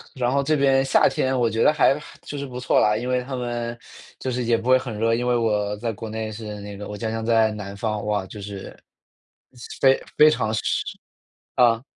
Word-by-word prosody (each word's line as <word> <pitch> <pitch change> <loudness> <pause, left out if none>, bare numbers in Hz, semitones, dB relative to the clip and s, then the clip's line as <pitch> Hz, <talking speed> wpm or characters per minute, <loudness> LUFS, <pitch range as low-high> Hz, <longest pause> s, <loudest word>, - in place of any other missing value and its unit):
然 125 -1 0
后 140 0 +2
这 155 +2 +2
边 135 -1 +3
夏 135 - +4
天 130 -1 0
我 120 -2 +2
觉 110 +1 0
得 - - +6
还 145 -2 +4
还 - - -14
就 145 - -6
是 140 - -4
不 125 -2 -7
错 125 - +2
啦， 105 0 +3
因 120 +3 -4
为 125 0 +1
它 130 +1 -5
们 120 -1 -3 0.4
就 130 - -3
是 125 0 -1
也 115 0 +2
不 115 +2 -6
会 130 - +7
很 125 -5 -5
热。 115 0 +2
因 125 +1 -2
为 125 - +3
我 105 -3 0
在 115 +1 -2
国 110 +2 -7
内 110 0 -4
是 105 -1 -7
那 100 0 -8
个 105 - -7
我 105 - -6
家 110 +1 -3
乡 115 0 -3
在 110 -1 +3
南 100 -2 -7
方， 105 -1 -3
哇， 105 -2 -1
就 105 +2 -10
是 100 -1 -8 1.0
非 135 0 +5 0.2
非 155 - +8
常 110 -7 0
湿， - - 0 0.9
啊。 120 -1 +4
115 Hz, 250 characters per minute, -23 LUFS, 105-130 Hz, 1.0 s, 非